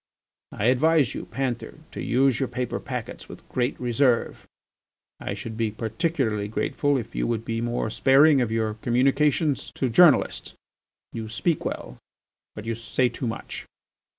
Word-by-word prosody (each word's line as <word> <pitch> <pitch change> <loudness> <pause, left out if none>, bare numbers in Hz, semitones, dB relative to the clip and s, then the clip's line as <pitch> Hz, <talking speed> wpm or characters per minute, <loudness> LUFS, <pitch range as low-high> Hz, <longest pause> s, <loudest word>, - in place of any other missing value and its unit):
I 100 - -3
advise 140 +2 +3
you, - - -6
Panther, 130 -3 -3 0.2
to - - -6
use 130 0 +2
your 135 - -1
paper 125 0 -3
packets - - -6
with - - -12
great 125 +1 -1
reserve. 120 - +1 0.7
I 100 - -4
should 110 +2 -7
be 115 -1 0
particularly 110 0 -1
grateful 140 +6 0
if 115 -3 -6
you - - -1
would 115 -1 -2
be 115 -1 -2
more 120 -2 -1
sparing 140 +3 +5
of 115 -3 -1
your 110 -1 0
communications 135 +5 +1
to 130 - 0
journalists. 155 +4 +4 0.6
You 110 -1 -5
speak 150 +9 -1
well, - - -5 0.6
but 105 - -8
you 115 - -1
say 120 +2 0
too 125 - -4
much. 115 - -6
120 Hz, 150 wpm, -25 LUFS, 115-135 Hz, 0.7 s, sparing